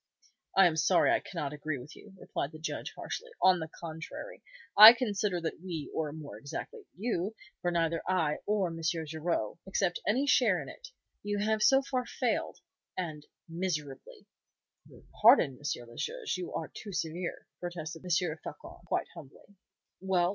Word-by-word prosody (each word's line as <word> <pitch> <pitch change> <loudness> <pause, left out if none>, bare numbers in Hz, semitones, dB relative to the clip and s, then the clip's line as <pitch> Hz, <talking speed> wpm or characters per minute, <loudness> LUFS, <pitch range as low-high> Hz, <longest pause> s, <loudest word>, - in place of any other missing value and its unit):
"I 195 - +8
am 165 -2 +2
sorry 175 +3 +4
I - - +3
cannot 150 -6 -5
agree 150 0 -3
with 135 +5 -11
you," 205 - -14
replied 145 -2 -4
the - - -8
Judge, 160 +3 -4
harshly. - - -6
"On 185 -1 +5
the 160 - -4
contrary, 165 - -7 0.3
I 215 +3 +13
consider 210 -6 -1
that 165 0 -4
we 170 -5 -5
or 155 -2 -1
more 145 -8 -9
exactly 405 - -7
you, 210 -1 -2 0.3
for 175 - +1
neither 165 -1 +1
I 165 -5 +1
nor 205 -3 +1
M. 165 0 -7
Garraud 160 -4 -2
accept 190 -2 0
any 255 +7 +2
share - - +4
in - - -7
it - - -11 0.3
you 205 0 -2
have 215 +1 +1
so 270 +5 +5
far 255 -2 -2
failed, - - -2 0.4
and 155 -5 -4 0.2
miserably." 160 -6 -4 0.6
"Your - - -16 0.2
pardon, 130 -2 +6
M. 130 -4 -4
le 120 - -14
Juge, 470 -2 -3
you 180 -1 -5
are 160 - -4
too 210 - -8
severe," 170 0 -3
protested 165 -2 -6
M. 180 - -7
Floçon, 170 -2 -3
quite - - 0
humbly. 170 +8 -14 0.4
"Well! 180 -2 +2
175 Hz, 165 wpm, -31 LUFS, 155-205 Hz, 0.6 s, I